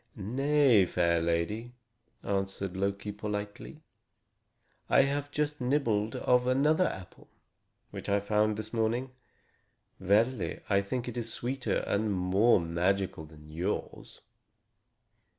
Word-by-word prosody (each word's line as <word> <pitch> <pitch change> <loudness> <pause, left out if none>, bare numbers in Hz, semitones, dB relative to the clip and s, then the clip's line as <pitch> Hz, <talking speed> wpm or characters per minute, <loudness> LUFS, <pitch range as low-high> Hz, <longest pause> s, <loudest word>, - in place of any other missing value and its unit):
"Nay, 125 0 +3
fair 85 -2 +1
lady," 95 +9 -2 0.5
answered 95 -1 -2
Loki 100 +2 -2
politely, 105 +8 -6 1.1
"I 135 - +6
have 140 +1 -2
just 150 -1 -2
nibbled 120 -5 0
of 125 0 +2
another 150 +7 +3
apple, 95 -1 -9 0.6
which - - -6
I 100 0 +3
found 105 +1 +1
this 110 +1 -7
morning. 120 +3 0 0.9
Verily, 105 +4 +1
I 100 0 +4
think 120 +5 -4
it 120 0 -5
is 115 -1 -3
sweeter 125 +3 -2
and 105 +1 0
more 95 +5 +3
magical 85 0 -1
than 75 -1 -15
yours." 90 +6 -4
105 Hz, 115 wpm, -30 LUFS, 95-125 Hz, 1.1 s, I